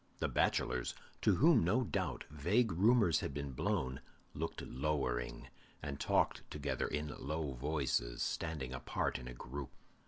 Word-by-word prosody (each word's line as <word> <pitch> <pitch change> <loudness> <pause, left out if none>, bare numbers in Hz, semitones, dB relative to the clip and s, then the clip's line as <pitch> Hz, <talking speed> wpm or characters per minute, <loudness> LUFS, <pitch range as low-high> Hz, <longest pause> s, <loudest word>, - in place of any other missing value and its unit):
The - - 0
bachelors, 60 -1 +1 0.3
to - - +4
whom, 150 -5 +6
no 110 +10 +3
doubt, - - -2
vague 95 +10 +2
rumors 100 -2 +5
had 70 - -4
been 70 -2 -3
blown, 65 +1 -1 0.3
looked 80 +2 -3
lowering, 65 -3 -1 0.3
and 70 -1 -4
talked - - +2
together 75 -1 -1
in 75 0 -2
low 75 +1 -2
voices, 65 -3 0
standing 75 -6 -2
apart 65 - -1
in 60 - -8
a 60 - -7
group. 65 +3 -6
75 Hz, 145 wpm, -36 LUFS, 65-80 Hz, 0.3 s, whom